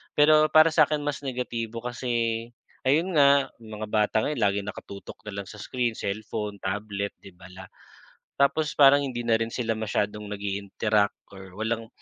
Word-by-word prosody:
Pero 155 +1 +6
para 155 +1 +7
sa'kin 150 -2 +3
mas 145 -3 -2
negatibo 120 -3 -4
kasi 115 -2 -2 0.4
ayun 165 +6 +2
nga, 140 -1 +5
yung 110 -1 -10
mga 110 - -3
bata 105 0 +1
ngayon 150 -4 -2
laging 100 0 0
nakatutok 100 0 -9
na 100 -1 -4
lang 95 - -12
sa 105 - -10
screen, 120 0 -2
cellphone, 105 0 -4
tablet, 100 +1 -3
'di 95 - -13
ba 90 +1 -14
la 95 +1 -10 0.7
Tapos 150 +2 +2
parang 140 0 +7
hindi 120 -3 -4
na 115 -1 +3
rin 115 - -1
sila 115 -3 -1
masyadong 105 -1 -2
nag-i-interact 100 +1 -1 0.2
or 95 -1 -12
walang 115 +1 -2
115 Hz, 165 wpm, -26 LUFS, 100-135 Hz, 0.7 s, para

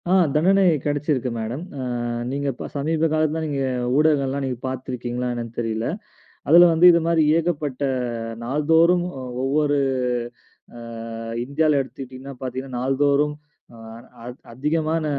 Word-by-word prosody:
அ. - - +2 0.2
தண்டனை 190 +6 +4 0.2
கிடைச்சிருக்கு 145 -3 -1
மேடம் 120 +8 -4 0.2
அ - - -3 0.5
நீங்க, 140 +2 -3
இப்ப - - -7
சமீபகாலத்துல 155 +1 0
நீங்க 145 -2 -2 0.4
ஊடகங்கள் 150 -3 +3
எல்லாம் 140 +1 -2
நீங்கப் 125 -1 -4
பாத்துருக்கீங்களா 125 -1 -4
என்னான்னு 115 -1 -6
தெரியல. 115 -1 -2 0.6
அதுல 175 +3 +8
வந்து 165 +2 +5
இது 170 - +3
மாதிரி 165 -1 +3 0.2
ஏகப்பட்ட 150 -5 -2 0.6
நாள்தோறும் 165 +6 +3 0.4
ஒவ்வொரு 145 +1 +1 1.0
அ - - -9 0.6
இந்தியால 150 +2 +2
எடுத்துக்கிட்டீங்கன்னா 130 +1 -9
பார்த்தீங்கன்னா 130 0 -5
நாள்தோறும், 140 +3 +2 0.4
அ - - -13 0.5
அத் 125 +2 -9
அதிகமான 155 +5 -1
145 Hz, 120 wpm, -22 LUFS, 130-155 Hz, 1.0 s, அதுல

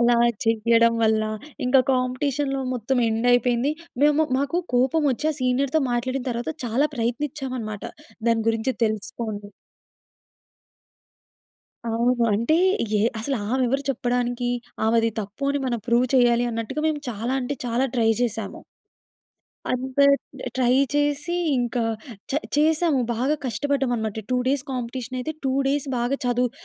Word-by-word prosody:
అలా 240 0 +4 0.3
చెయ్యడం 230 +1 +3
వల్ల. 220 -1 +3 0.4
ఇంకా 255 +1 +5
కాంపిటీషన్‌లో 270 +2 0
మొత్తం 250 +2 -1
ఎండ్ 225 +2 0
అయిపోయింది. 245 +3 +2 0.3
మేము 300 +1 +4
మాకు 280 +5 0 0.2
కోపం 260 +6 +3
వచ్చి, 270 +4 -2
ఆ - - -8
సీనియర్‌తో 260 +4 +1
మాట్లాడిన 250 +2 -1
తరువాత 240 +5 -3
చాలా 250 +6 +1
ప్రయత్నించాం 260 +4 -2
అనమాట. 215 -2 -6 0.5
దాని 230 -1 +2
గురించి 225 +3 0
తెలుసుకోవాలి. 215 -1 -3 2.4
అవును. 235 +2 +1
అంటే 235 +9 +2 0.4
ఏ - - +2 0.2
అసలామెవరు 255 +2 0
చెప్పడానికి? 245 -1 -1 0.4
ఆమెది 230 0 +3
తప్పు 205 +6 -9
అని 285 - -1
మనం 240 -2 -1
ప్రూవ్ 240 +1 +3
చెయ్యాలి 240 -1 +4
అన్నట్టుగా, 230 +6 -3
మేము 305 -2 -1
చాలా 230 +3 -3
అంటే 260 +3 -2
చాలా 240 +2 +1
ట్రై 225 -2 +3
చేసాము. 225 -3 -3 1.1
అంత 260 +2 -4 0.6
ట్రై 250 -1 +3 0.2
చేసి, 290 +3 0 0.2
ఇంకా 240 -1 0 0.5
చ - - -3 0.2
చేసాము. 310 -1 +3
బాగా 260 +6 +1
కష్టపడ్డాం 270 +3 0
అనమాట. 220 -1 -3
2 255 - +2
డేస్ 275 0 +1
కాంపిటీషన‌యితే, 255 +3 -4
2 265 - +1 0.2
డేస్ 285 +1 0
బాగా 245 +3 0
చదువు 245 0 +1
245 Hz, 125 wpm, -24 LUFS, 230-270 Hz, 2.4 s, ఇంకా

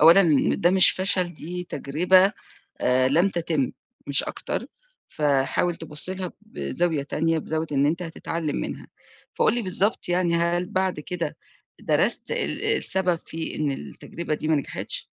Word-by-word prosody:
أولًا 175 +4 +8 0.3
ده 175 - +3
مش 190 -1 +6
فشل 185 -2 0
دي 180 +4 -6
تجربة، 180 +7 +3 0.5
آآ، 130 +1 +3
لم 170 +8 +3
تتم 165 -7 -1 0.3
مش 140 0 +3
أكتر، - - -4 0.4
فحاول 145 +4 +1
تبُص 160 +2 -2
لها 185 -1 -4
بزاوية 175 -7 -2
تانية، 160 +3 0
بزاوية 160 +1 -2
إن 140 0 +3
أنت 165 +4 0
هتتعلم 165 -2 -3
منها. - - -4 0.5
فقُل - - +3
لي 240 - 0
بالضبط 195 +2 +1
يعني 175 -1 +2
هل 170 +1 +1
بعد 190 -4 -1
كده 170 -1 -4 0.4
درست - - +1
ال - - -1
السبب 185 -2 +1
في 160 0 -5
إن 150 -2 0
التجربة 155 - -5
دي 155 +1 -4
ما 160 - +4
نجحِتش؟ 140 - -4
170 Hz, 145 wpm, -25 LUFS, 150-180 Hz, 0.5 s, أولًا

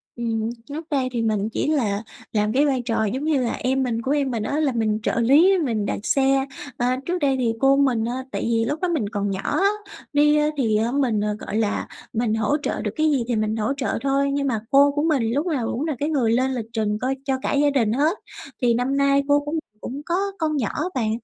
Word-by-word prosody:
Ừm, 225 -1 -2 0.2
trước 315 +3 -6
đây 265 -3 0
thì 235 -2 -1
mình 215 -1 0
chỉ 230 - -2
là 225 -9 0 0.3
làm 210 0 0
cái 285 +3 +3
vai 265 -3 +1
trò 225 -2 0
giống 260 +8 -2
như 305 -4 +1
là 235 - -1
em 265 +1 0
mình 230 -2 -1
của 265 - -2
em 280 -3 +1
mình 225 -3 -2
á, 290 +6 -1
là 290 -4 +2
mình 220 -2 0
trợ - - 0
lý, 305 +11 +5
mình 220 -4 -1
đặt - - -2
xe. 270 0 +2 0.3
Ờ, 245 - 0 0.2
trước 360 +1 -1
đây 280 -4 +2
thì 230 -2 +1
cô 270 0 +5
mình 250 -5 +2
á 240 +2 -2 0.2
tại - - -3
vì 230 -1 +1
lúc 295 +6 -3
đó 365 - +1
mình 250 -12 -1
còn 205 -2 -2
nhỏ 190 - -3
á, 395 +1 +2 0.4
đi 295 +1 +4 0.2
thì, 225 -6 +2
à, 225 +2 0
mình, 245 -6 +1 0.2
gọi 210 - -4
là, 215 -2 -1 0.3
mình 225 -1 0
hỗ 225 +7 +1
trợ - - -2
được - - -2
cái 310 -1 +2
gì 260 -4 +1
thì 240 - 0
mình 215 0 0
hỗ 220 +5 0
trợ 265 - -1
thôi. 275 0 +1
Nhưng 280 0 0
mà 230 -5 0
cô 280 +1 +6
của 290 +1 -1
mình 270 -9 +1
lúc 290 +5 0
nào 270 -9 -1
cũng 270 +6 -2
là 300 - -1
cái 295 +2 0
người 250 -7 +1
lên 260 +3 +2
lịch 225 -3 -3
trình 210 -2 0
coi 265 +1 0
cho 265 -2 0
cả - - -1
gia 290 0 +3
đình 230 -6 +1
hết, 305 - +1 0.4
thì 240 -1 +3
năm 250 +4 0
nay 280 0 +3
cô 285 0 +4
cũng 295 +2 -3 0.2
cũng 275 +4 -6
có 345 - 0 0.2
con 310 -2 0
nhỏ 235 -7 0
á - - -2
bạn. 225 -4 0
260 Hz, 255 wpm, -23 LUFS, 225-285 Hz, 0.4 s, cô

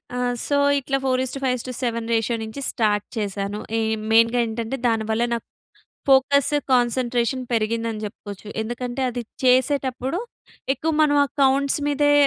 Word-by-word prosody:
ఆ! - - -2 0.3
సో, 285 - +1 0.2
ఇట్లా 275 0 -1
4:5:7 255 -2 -1
రేషియో 225 +1 +1
నుంచి 220 +5 -7
స్టార్ట్ 210 -4 +1
చేశాను. 200 0 -3 0.2
ఈ - - +1 0.3
మెయిన్‌గా 230 +2 +5
ఏంటంటే 230 +3 -3
దానివల్ల 220 0 0
నా - - +1 0.7
ఫోకస్ 270 +1 +4 0.2
కాన్సంట్రేషన్ 245 0 +1
పెరిగిందని 225 -1 -1
చెప్పుకోవచ్చు. 205 0 -8
ఎందుకంటే 240 +3 -4
అది 245 0 -4 0.2
చేసేటప్పుడు 260 +3 +2 0.5
ఎక్కువ 320 +4 -1
మనం 290 -1 +3
ఆ - - -2 0.2
కౌంట్స్ 275 +1 +3
మీదే 290 0 +3
245 Hz, 120 wpm, -23 LUFS, 225-265 Hz, 0.7 s, మెయిన్‌గా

